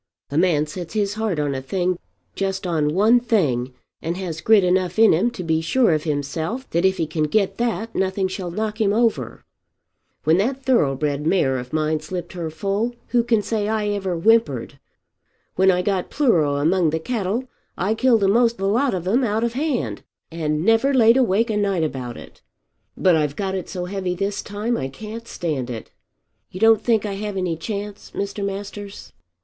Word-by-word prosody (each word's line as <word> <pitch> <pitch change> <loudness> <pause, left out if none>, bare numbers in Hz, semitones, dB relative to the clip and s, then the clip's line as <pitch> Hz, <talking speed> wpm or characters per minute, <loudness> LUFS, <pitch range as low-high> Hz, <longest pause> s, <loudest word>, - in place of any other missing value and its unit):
A 145 - -1
man 165 -4 +3
sets 170 +5 -7
his 205 -2 0
heart 215 -5 -2
on 145 -1 0
a 135 - -3
thing, 180 +5 -1 0.3
just 195 -1 -2
on 155 -3 0
one 220 +5 +5
thing, 145 - 0 0.3
and 170 +2 -3
has 170 -4 -5
grit 215 -3 +5
enough 180 0 +1
in 225 0 +6
him 180 +9 +2
to 235 -6 -7
be 160 -1 +1
sure 230 +6 +3
of 155 0 -1
himself 160 - -3
that 170 +3 +1
if 190 0 +3
he 165 - 0
can 155 0 -1
get 195 +4 0
that 230 -2 -1
nothing 190 0 0
shall 185 -1 -5
knock 215 +4 -3
him 200 -2 +3
over. 215 - 0 0.8
When 160 +4 +3
that 260 +6 -1
thoroughbred 150 - +1
mare 135 -8 +2
of 125 0 -8
mine 155 0 0
slipped 175 +4 -6
her 170 -3 -4
foal 200 +8 -2
who 240 -1 +3
can 230 -3 +2
say 210 -2 -1
I 215 -1 0
ever 195 -3 -2
whimpered. 165 - +2 0.7
When 190 +1 +3
I 180 -1 +2
got 190 -2 -1
pleuro 170 - +2
among 165 +4 +2
the 160 +1 -1
cattle 225 +5 -2 0.3
I 195 +5 +1
killed 230 -2 +3
a'most 230 +4 +3
the 195 - -2
lot 245 +3 +2
of 180 -1 -4
'em 240 +7 +2
out 220 -1 0
of 235 0 0
hand, 245 - -2 0.3
and 155 -1 -1
never 225 +5 +3
laid 230 -2 +6
awake 230 -2 +2
a 210 - 0
night 195 -5 +1
about 130 -6 -4
it. - - -13 0.6
But 185 -3 +4
I've 150 -2 0
got 195 +1 -2
it 190 -2 -4
so 180 -2 -4
heavy 185 -1 -3
this 200 +2 -2
time 215 +4 -2
I 130 - -2
can't 220 - -8
stand 145 -8 -3
it. 115 -3 -7 0.6
You 185 - -8
don't 225 0 +5
think 220 -2 +1
I 205 - -3
have 205 0 -4
any 180 -3 -1
chance, 205 +3 -6
Mr. 200 0 -3
Masters?" 200 0 -6
190 Hz, 195 wpm, -22 LUFS, 160-220 Hz, 0.8 s, in